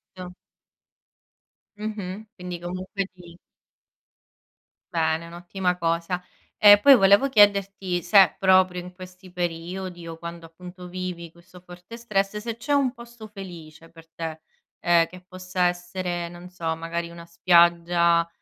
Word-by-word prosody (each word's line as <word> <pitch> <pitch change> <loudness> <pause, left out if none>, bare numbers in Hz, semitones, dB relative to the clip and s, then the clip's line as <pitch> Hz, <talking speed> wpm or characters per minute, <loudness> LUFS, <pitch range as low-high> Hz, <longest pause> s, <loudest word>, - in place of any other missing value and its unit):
Certo. 180 -1 -9 1.4
Mh-mh. 210 -1 -6
Quindi 180 -1 -7
comunque 185 +3 -4
ti 175 -2 -15 1.6
Bene, 160 0 0
è - - -11
un'ottima 180 +2 -3
cosa. 170 +1 -1 0.4
E 205 -1 +8
poi 275 +5 +8
volevo 200 +5 +5
chiederti 200 -5 +2
se 195 +3 +5
proprio 185 -1 +3
in 180 +1 -10
questi 185 0 -13
periodi 175 0 -5
o 165 0 -7
quando 170 0 -9
appunto 180 +2 -12
vivi 180 -2 -6
questo 170 +1 -17
forte 180 +5 -12
stress, 210 -3 -1
se 225 +1 -5
c'è 290 +5 -2
un 275 -3 +2
posto 235 -3 -12
felice 170 -6 -11
per 165 -1 -16
te, 160 -1 -6 0.4
ehm, 170 -1 +3
che 185 +1 -13
possa 185 0 -2
essere, 175 -1 -4
non 175 +1 -12
so, 165 -3 -3
magari 170 +1 -4
una 170 0 -11
spiaggia 170 0 +3
180 Hz, 135 wpm, -24 LUFS, 170-195 Hz, 1.6 s, E